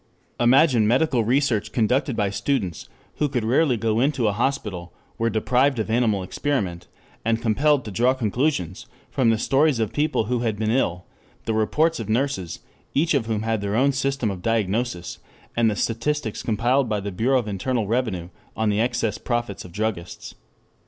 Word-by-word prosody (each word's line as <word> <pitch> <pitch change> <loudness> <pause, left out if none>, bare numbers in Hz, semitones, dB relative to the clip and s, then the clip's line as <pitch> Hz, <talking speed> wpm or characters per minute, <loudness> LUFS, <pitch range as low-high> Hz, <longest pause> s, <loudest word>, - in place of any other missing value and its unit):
Imagine 125 -2 +4
medical 125 0 +2
research 115 -3 +1
conducted 125 +4 +1
by 100 -3 0
students 100 - -2 0.3
who 150 - +1
could 125 -4 -1
rarely 125 +3 +2
go 110 0 0
into 135 -3 +1
a - - +3
hospital, 105 -8 -2 0.3
were 115 0 +2
deprived 125 +5 +2
of 110 0 -2
animal 110 -5 +2
experiment, 95 - -2 0.4
and 115 0 +1
compelled 135 +5 +2
to 105 - -6
draw 125 +6 +2
conclusions 115 - -1 0.2
from 130 -4 +2
the 115 - +3
stories 135 +3 +2
of 110 0 -1
people 150 -4 +1
who 120 +3 -1
had 115 -3 -1
been 110 +1 0
ill, 90 -8 0 0.4
the 110 - 0
reports 155 +9 +1
of - - -5
nurses, 115 - -1 0.3
each 160 +4 +2
of 130 -6 +1
whom 110 -2 -1
had 110 -2 -1
her 100 +1 -2
own 135 +4 +3
system 135 -4 -1
of 95 -2 -7
diagnosis, 110 -2 -1 0.4
and 115 -1 +3
the 105 - -1
statistics 115 +2 -2
compiled 120 +4 +1
by 105 -1 0
the 100 +1 -5
Bureau 120 +8 +2
of 120 -4 -2
Internal 110 +3 -1
Revenue 105 -6 -1 0.3
on 110 -1 +1
the 105 +1 +1
excess 120 -2 -1
profits 120 -5 -3
of 90 - -11
druggists. 95 -3 -4
115 Hz, 175 wpm, -23 LUFS, 105-130 Hz, 0.4 s, Imagine